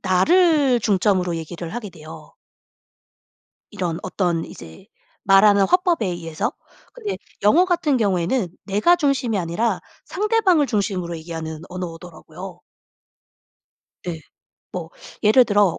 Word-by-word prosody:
나를 275 - +3
중점으로 190 -4 +1
얘기를 165 +3 -7
하게 220 -5 -5
돼요. 155 -2 -13 1.4
이런 170 -3 -3
어떤 175 -4 -1
이제 80 -1 -12 0.4
말하는 200 0 +5
화법에 355 - +2
의해서 165 -3 -3 0.4
근데 430 -5 -5 0.3
영어 310 - +5
같은 335 -7 +1
경우에는 190 0 0
내가 210 - +3
중심이 275 - 0
아니라 180 +7 -1 0.3
상대방을 405 -6 +2
중심으로 190 -6 -2
얘기하는 160 -1 -6
언어더라고요. 175 -2 -9 1.5
예. 165 -2 -4 0.5
뭐 - - -6 0.3
예를 230 +4 +6
들어 205 -5 +2
195 Hz, 265 characters per minute, -21 LUFS, 170-265 Hz, 1.5 s, 예를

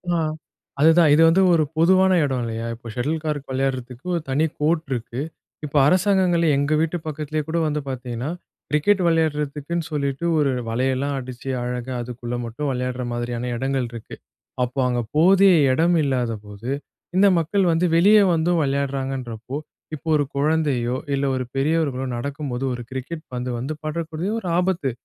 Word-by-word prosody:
ஆ. - - +2 0.6
அதுதான். 160 +1 +6
இது 155 - +5
வந்து 180 +4 +4
ஒரு 160 - +4
பொதுவான 185 +3 +5
எடம் 130 -3 -1
இல்லையா? 115 0 -4
இப்போ 115 0 -13
ஷட்டில் 150 +7 -2
கார்க் 145 -3 -3
விளையாடுறதுக்கு, 130 0 -3
ஒரு 170 - -1
தனி 145 +4 +2
கோர்ட் 160 +1 +1
இருக்கு. 120 0 -3 0.4
இப்போ 145 0 -2
அரசாங்கங்களே 180 -2 +3
எங்க 145 +2 +1
வீட்டு 165 +2 0
பக்கத்திலயே 155 0 -3
கூட 165 - -1
வந்து 150 0 -1
பாத்தீங்கன்னா, 125 0 -4 0.4
கிரிக்கெட் 190 +7 +2
வளையாடுறதுக்குன்னு 155 0 0
சொல்லிட்டு, 140 +1 -2
ஒரு 140 -2 +2 0.2
வலையெல்லாம் 130 +4 0
அடிச்சு, 130 0 -7
அழகா 125 +1 -4
அதுக்குள்ள 120 0 -5
மட்டும், 130 +6 -3
விளையாடுற 125 0 -2
மாதிரியான 120 0 -3
எடங்கள் 135 -1 -1
இருக்கு. 115 -2 -9 0.5
அப்போ 125 +2 -3
அங்க 120 -1 0
போதிய 190 +4 +6 0.2
எடம் 165 +6 +3
இல்லாதபோது, 115 -5 -3 0.5
இந்த 200 +2 +6
மக்கள் 185 +4 +1
வந்து, 165 +2 +2
வெளியே 205 +5 +6
வந்தும் 165 +1 +2
வளையாடுறாங்கன்றப்போ, 135 -3 -3 0.4
இப்போ 155 - -13
ஒரு 145 - +2
குழந்தையோ, 140 -5 +1 0.2
இல்ல 140 - 0
ஒரு 130 - -1
பெரியவர்களோ 140 -2 0
நடக்கும்போது, 135 0 -4
ஒரு 120 0 -5
கிரிக்கெட் 145 +5 -6
பந்து 125 0 -3
வந்து, 135 +5 -3
படக்கூடிய 160 +3 -3
ஒரு 185 - -5
ஆபத்து. 180 -7 0
140 Hz, 150 wpm, -22 LUFS, 125-160 Hz, 0.6 s, அதுதான்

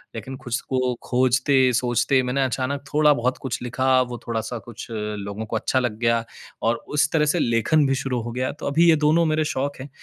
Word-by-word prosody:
लेकिन 130 +4 -6
खुश 120 +2 -2
को 130 -1 -1 0.2
खोजते-सोचते 130 0 +2
मैंने 130 +2 0
अचानक 130 +2 -2
थोड़ा-बहुत 145 -5 +3
कुछ 120 - -3
लिखा, 130 +1 +2
वो 125 -1 -4
थोड़ा-सा 115 +1 -3
कुछ 120 +1 -9
लोगों 105 -1 -4
को 110 - -5
अच्छा 130 +3 0
लग 120 -4 -2
गया 115 -1 +2 0.4
और 115 +1 0
उस 145 0 +1
तरह 155 -2 +3
से - - +1
लेखन 120 +6 +2
भी 135 - +1
शुरू 125 -3 -2
हो 120 - -5
गया। 130 +2 -2
तो - - -4
अभी 165 +4 +4
ये 165 - +6
दोनों 165 +2 +4
मेरे 155 0 +1
शौक 140 +2 -2
है, 140 - -8
130 Hz, 200 wpm, -23 LUFS, 120-140 Hz, 0.4 s, ये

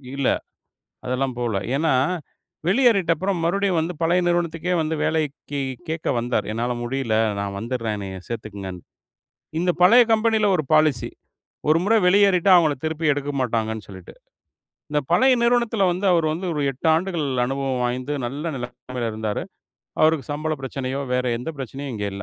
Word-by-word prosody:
இல்ல. 140 -2 0 0.8
அதெல்லாம் 130 +1 -1
போல. 120 -4 -1 0.2
ஏன்னா 160 +2 +2 0.7
வெளியேறிட்ட 200 -4 +4
அப்புறம் 190 +3 -1
மறுபடியும் 195 +2 +1
வந்து 165 +3 -2
பழைய 170 +2 +3
நிறுவனத்துக்கே 175 0 0
வந்து 160 0 -1
வேலைக்குக் 145 -3 -2 0.2
கேக்க 160 0 -3
வந்தார். 120 -3 -1
"என்னால 120 +2 -1
முடியல 120 -2 -1 0.2
நான் 100 -1 -3
வந்துர்றேன் 115 -1 -3
என்னைய 95 -2 -6
சேர்த்துக்கங்கன்னு." 100 -5 -6 0.8
இந்தப் 175 -1 0
பழைய 235 +8 +8
கம்பெனில 220 -1 +3
ஒரு 155 - -2
பாலிசி. 155 -6 +3 0.6
ஒரு 155 +1 +5
முறை 225 +3 +4
வெளியேறிட்டா 195 -1 +4
அவங்கள 160 -4 +3
திருப்பி 160 0 -1
எடுக்கமாட்டாங்கன்னு 120 -7 -2
சொல்லிட்டு. 95 -3 -11 0.8
இந்தப் 150 -2 -1
பழைய 260 +9 +5
நிறுவனத்துல 235 -4 +2
வந்து, 185 +3 -4
அவர் 165 -2 +2
வந்து 175 +4 -4
ஒரு 150 - -2
8 135 +4 -5
ஆண்டுகள் 170 -1 -1 0.2
அனுபவம் 135 0 -2
வாய்ந்து 125 +3 -2
நல்ல 140 +6 -4
நிலைமையில 125 -1 -5
இருந்தாரு. 110 -1 -3 0.6
அவருக்குச் 155 -2 +2
சம்பள 155 +2 -2
பிரச்சனையோ, 135 0 -3
வேற 125 0 +1
எந்த 125 +7 -4
பிரச்சனையும் 135 +1 -6
இங்க 105 -2 -3
இல்ல. 100 +1 -6
145 Hz, 145 wpm, -23 LUFS, 125-175 Hz, 0.8 s, பழைய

